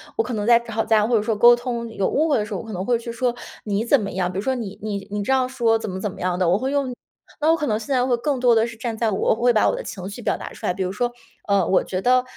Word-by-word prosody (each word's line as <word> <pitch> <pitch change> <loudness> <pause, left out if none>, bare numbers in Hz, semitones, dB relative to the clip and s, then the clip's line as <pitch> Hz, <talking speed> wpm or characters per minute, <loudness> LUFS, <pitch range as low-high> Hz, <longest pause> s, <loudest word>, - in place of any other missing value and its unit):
我 450 - +1
可 250 - -5
能 210 -1 -2
在 235 -1 +7
吵 230 -1 -3
架， 220 -1 +3
或 235 +1 +2
者 - - +1
说 220 +1 -1
沟 240 +3 +7
通 240 -1 -3
有 195 -3 -1
误 315 +2 +1
会 290 - +3
的 210 - -1
时 - - -7
候， - - -3
我 - - -12
可 220 - -8
能 185 -1 -4
会 240 +1 +2
去 235 0 -7
说 240 +1 -1 0.3
“你 205 0 0
怎 255 +4 +4
么 200 - -4
样”， 180 -1 -1
比 185 - -6
如 - - 0
说： 260 +5 0
“你 215 -5 -6
你 200 -2 -4
你 205 0 -2
这 235 +7 +1
样 260 -1 +1
说 235 -3 +2
怎 220 - -5
么 185 - -5
怎 210 - -2
么 - - -10
样 180 0 -1
的。” 185 - +2
我 180 +3 +3
会 260 +5 -2
用 275 -3 -1 0.5
那 310 +2 +4
我 330 - +3
可 300 -2 -2
能 215 - +1
现 225 +5 -4
在 250 -1 +2
会 255 -2 +2
更 265 +3 -1
多 245 -2 +4
的 225 0 +3
是 230 0 -8
站 225 0 -4
在 225 -1 +1
我， 190 - -2
我 - - +3
会 245 +2 +3
把 215 -3 +3
我 - - -1
的 - - -5
情 190 -2 -7
绪 205 +4 -8
表 - - 0
达 - - -8
出 - - -9
来。 - - +1
比 190 +1 -3
如 185 - -2
说， 240 +4 -1 0.4
呃， 200 -3 +3
“我 190 - +3
觉 185 - -3
得”， 250 +3 +3
225 Hz, 375 characters per minute, -22 LUFS, 205-245 Hz, 0.5 s, 在